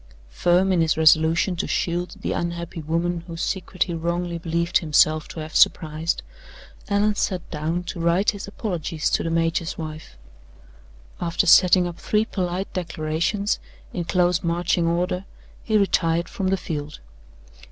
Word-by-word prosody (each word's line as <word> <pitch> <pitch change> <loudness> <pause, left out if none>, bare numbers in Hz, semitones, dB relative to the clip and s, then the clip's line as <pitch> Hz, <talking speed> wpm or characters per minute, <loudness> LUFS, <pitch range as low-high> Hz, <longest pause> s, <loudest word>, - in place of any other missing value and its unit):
Firm 180 - +2
in 180 -3 +3
his 160 -1 +2
resolution 160 +3 +4
to - - -2
shield 175 +1 -1
the - - -2
unhappy 170 0 -3
woman 170 +2 -1
whose 165 0 -5
secret 190 -1 -1
he 175 - -5
wrongly 170 +1 -2
believed 170 +1 0
himself 155 -1 +3
to 160 - -7
have 155 0 -8
surprised, 160 0 +2 0.7
Allan 205 +1 +2
sat 185 -3 -2
down 160 +3 -2
to 175 - -6
write 170 +4 +2
his 200 -1 -8
apologies 175 -7 -3
to - - +2
the 165 - -2
major's 165 +1 0
wife. 155 - -8 1.0
After 170 +3 0
setting 180 +1 +6
up 175 -1 -6
three 215 +1 +1
polite 185 -2 -3
declarations, 170 +4 -1 0.3
in 175 - -3
close 180 0 +2
marching 170 0 0
order, 180 +2 -1 0.4
he 215 -1 +2
retired 170 -4 +1
from 195 -5 -3
the 195 +1 +2
field. 150 -4 -5
170 Hz, 150 wpm, -23 LUFS, 165-180 Hz, 1.0 s, setting